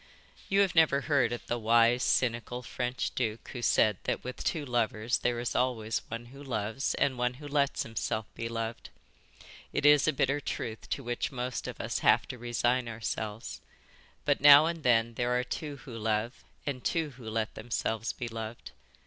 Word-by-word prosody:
You 195 +1 +4
have 195 -2 +2
never 160 -4 +4
heard 140 -5 +2
of 120 - -5
the 120 - -2
wise, 115 +2 +4
cynical 125 0 0
French 125 +1 -3
duke 110 0 -3
who 125 - -6
said 105 -4 +3
that - - -1
with 125 0 -6
two 155 -4 -1
lovers 120 -2 0
there 120 -1 0
is 120 - -2
always 115 -3 0
one 115 +1 -6
who 140 - -11
loves 120 -1 -2
and 130 -3 +1
one 125 0 0
who 145 +3 -9
lets 140 -1 +1
himself 110 -1 -3
be 115 - -4
loved; 115 0 -4 0.8
it - - -1
is 145 0 +6
a - - +5
bitter 135 0 +1
truth 115 -4 -5
to 135 - -2
which 120 0 -2
most 125 -1 -3
of - - -7
us - - -2
have - - +4
to 125 - -6
resign 120 +1 0
ourselves; 110 -1 -4 0.6
but - - +2
now 145 +1 +10
and 165 0 -2
then 115 -3 +3
there 120 +1 0
are - - 0
two 145 +3 -5
who 125 -5 -8
love 110 +2 -2 0.2
and 130 -3 -3
two 160 -3 0
who 120 -4 -9
let 110 0 -2
themselves 115 -1 -2
be 120 - -5
loved. 115 - -7
120 Hz, 185 wpm, -30 LUFS, 115-135 Hz, 0.8 s, now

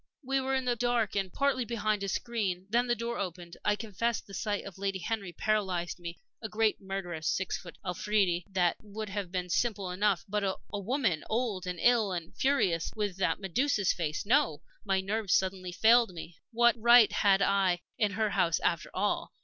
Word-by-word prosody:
We 270 +1 0
were 265 0 0
in 260 -1 -1
the 245 -1 +1
dark 240 -2 0
and 195 -2 -1
partly 275 +1 +1
behind 215 -3 -1
a 200 - -2
screen. 195 -5 -2
Then 240 +2 +2
the 240 - +2
door 235 +1 -4
opened. 175 -2 -5
I 210 - +2
confess 225 +2 -2
the 195 - -14
sight 205 +1 -2
of 195 -1 -10
Lady 195 -1 -1
Henry 195 0 -3
paralyzed 185 -3 -1
me. 170 -1 -7 0.2
A 220 - -5
great, 215 0 +1
murderous, 180 -5 -4
six 190 - 0
foot 175 -3 -9
Afridi 180 -1 +1
that 180 -3 +1
would 215 0 -7
have 200 -3 -4
been 180 -1 -2
simple 200 0 0
enough. 195 -1 +1
But 205 +1 -1
a 190 -1 -1 0.2
woman 205 - 0
old 215 -6 -1
and 180 0 -3
ill 230 -5 +3
and 170 -2 -6
furious 195 - +1
with 205 -4 -2
that 190 - 0
Medusa's 205 +2 +1
face 155 -1 -3
no! 160 - +2 0.2
My 195 -2 +1
nerves 200 -1 0
suddenly 185 -1 -1
failed 230 +4 +5
me. 165 -1 -9
What 235 0 +4
right 235 -1 +7
had 200 -2 +3
I 190 -3 +2 0.2
in 210 -2 +2
her 215 +1 0
house, 175 -4 +2
after 170 -1 0
all? 205 +2 -1
200 Hz, 190 wpm, -30 LUFS, 180-225 Hz, 0.2 s, right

